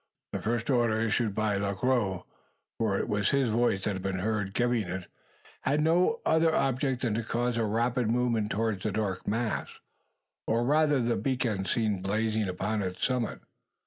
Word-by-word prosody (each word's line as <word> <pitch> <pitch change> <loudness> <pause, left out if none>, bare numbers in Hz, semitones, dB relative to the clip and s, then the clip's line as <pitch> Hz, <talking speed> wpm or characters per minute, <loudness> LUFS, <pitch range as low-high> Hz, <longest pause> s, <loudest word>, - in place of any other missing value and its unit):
That - - -3
first 115 +1 0
order 120 -3 +2
issued 110 -1 0
by 105 -2 +1
Le 100 0 -1
Gros 100 -5 0 0.6
for 105 -4 +1
it - - -2
was 105 -2 +1
his 135 -3 +2
voice 110 -4 +1
that 105 - 0
had 95 - -5
been 95 0 -2
heard 105 0 -2
giving 120 -4 +1
it 90 0 -4 0.6
had 145 - +1
no 175 +8 +2
other 160 0 +3
object 135 -1 0
than 115 -4 +1
to 115 - 0
cause 120 +2 -1
a 115 -1 +1
rapid 115 +2 0
movement 115 -3 +1
towards 110 -3 -1
the 110 - -1
dark 100 -2 -2
mass, 115 +1 -1 0.8
or 115 +1 +2
rather 150 0 +3
the 120 -1 +1
beacon 120 -7 -1
seen 105 -3 0
blazing 110 +2 0
upon 105 +4 -1
its 90 -1 -2
summit. 125 -3 -1
110 Hz, 175 wpm, -29 LUFS, 100-125 Hz, 0.8 s, other